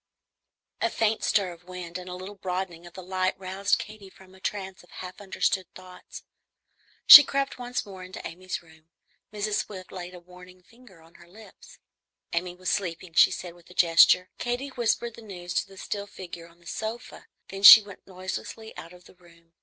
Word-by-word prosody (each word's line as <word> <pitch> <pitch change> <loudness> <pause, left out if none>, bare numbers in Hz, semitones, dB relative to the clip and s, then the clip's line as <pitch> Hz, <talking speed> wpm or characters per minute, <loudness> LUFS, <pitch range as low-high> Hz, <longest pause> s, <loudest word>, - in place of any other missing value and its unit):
A - - +2
faint 220 0 0
stir 195 -4 +1
of 170 +1 -19
wind 180 -1 -7
and 180 0 -10
a 180 - -6
little 185 +3 -8
broadening 180 -3 -5
of 175 - -15
the 185 - -9
light 185 0 -1
roused 195 +2 0
Katy 210 -2 -10
from 190 0 -19
a 190 - -17
trance 190 -1 -5
of 175 - -22
half 180 +2 -10
understood 190 -2 -1
thoughts. 185 0 -12 0.8
She 290 - +13
crept 275 -1 -3
once 245 0 -4
more 190 -2 -10
into 185 0 -8
Amy's 185 +2 -7
room. 160 -1 -22 0.4
Mrs. 210 0 -1
Swift 185 -3 -11
laid 180 -1 -8
a - - -10
warning 180 +1 -16
finger 225 -6 -20
on 165 +1 -21
her 170 - -17
lips; 215 +5 -16 0.6
Amy 175 +1 -2
was 185 +1 -3
sleeping, 180 -3 -3
she - - +6
said 175 -2 -7
with 175 0 -21
a 180 - -15
gesture. 175 +2 +5
Katy 245 +3 -3
whispered 235 -2 -1
the 230 - -13
news 180 -5 -8
to - - -1
the 195 0 -16
still 200 +1 -5
figure 175 -4 -10
on 170 0 -22
the 170 - -24
sofa, 220 +8 -7 0.2
then 195 0 -7
she 215 +2 +11
went 200 -2 -14
noiselessly 190 +4 -7
out 165 +2 -10
of 180 0 -17
the - - -17
room. 170 -2 -23
185 Hz, 195 wpm, -26 LUFS, 175-205 Hz, 0.8 s, She